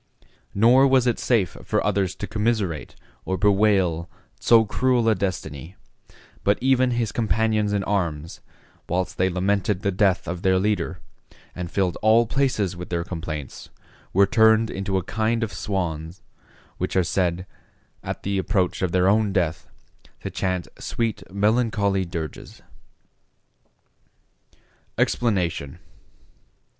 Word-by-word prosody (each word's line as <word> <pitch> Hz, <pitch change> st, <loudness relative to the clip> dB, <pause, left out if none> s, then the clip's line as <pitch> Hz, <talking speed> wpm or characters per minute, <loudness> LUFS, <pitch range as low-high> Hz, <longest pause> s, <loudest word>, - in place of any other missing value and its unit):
Nor 120 Hz, +6 st, +6 dB
was 130 Hz, -2 st, +3 dB
it 120 Hz, -2 st, +1 dB
safe 105 Hz, -9 st, +1 dB
for -, -, 0 dB
others 100 Hz, -3 st, 0 dB
to -, -, -5 dB
commiserate 105 Hz, -7 st, -2 dB, 0.3 s
or 95 Hz, -, -2 dB
bewail 95 Hz, -4 st, +2 dB, 0.3 s
so 115 Hz, -1 st, +5 dB
cruel 125 Hz, +2 st, +1 dB
a 110 Hz, -, +5 dB
destiny; 90 Hz, -4 st, -4 dB, 0.7 s
but 100 Hz, +1 st, +3 dB
even 130 Hz, -1 st, +3 dB
his 120 Hz, -3 st, -1 dB
companions 110 Hz, -2 st, +1 dB
in 100 Hz, -1 st, 0 dB
arms, 85 Hz, -6 st, -2 dB, 0.5 s
whilst 90 Hz, +1 st, -2 dB
they 95 Hz, +1 st, +3 dB
lamented 95 Hz, +1 st, 0 dB
the 100 Hz, -, +1 dB
death 95 Hz, -1 st, +1 dB
of 85 Hz, 0 st, -4 dB
their 95 Hz, -1 st, +3 dB
leader, 100 Hz, -2 st, -1 dB, 0.6 s
and 90 Hz, -1 st, -5 dB
filled 95 Hz, -2 st, -1 dB
all 110 Hz, +2 st, +5 dB
places 115 Hz, -7 st, 0 dB
with 90 Hz, 0 st, -8 dB
their 85 Hz, -1 st, -1 dB
complaints, 80 Hz, -5 st, -6 dB, 0.4 s
were 100 Hz, +2 st, +5 dB
turned 110 Hz, +2 st, +4 dB
into 95 Hz, 0 st, -2 dB
a 95 Hz, -, -1 dB
kind 115 Hz, +4 st, -1 dB
of 110 Hz, -3 st, -4 dB
swans, 85 Hz, -3 st, -4 dB, 0.6 s
which -, -, -2 dB
are 95 Hz, -, +4 dB
said, 90 Hz, 0 st, -1 dB, 0.6 s
at -, -, -6 dB
the 100 Hz, 0 st, -1 dB
approach 95 Hz, -1 st, 0 dB
of 90 Hz, -2 st, 0 dB
their 90 Hz, 0 st, +3 dB
own 105 Hz, +1 st, +3 dB
death, 90 Hz, -5 st, -1 dB, 0.5 s
to -, -, -5 dB
chant 90 Hz, -3 st, -2 dB
sweet 115 Hz, -3 st, -2 dB
melancholy 105 Hz, -2 st, +1 dB
dirges. 85 Hz, -3 st, -7 dB, 2.3 s
EXPLANATION. 90 Hz, -, 0 dB
100 Hz, 130 wpm, -23 LUFS, 90-110 Hz, 2.3 s, Nor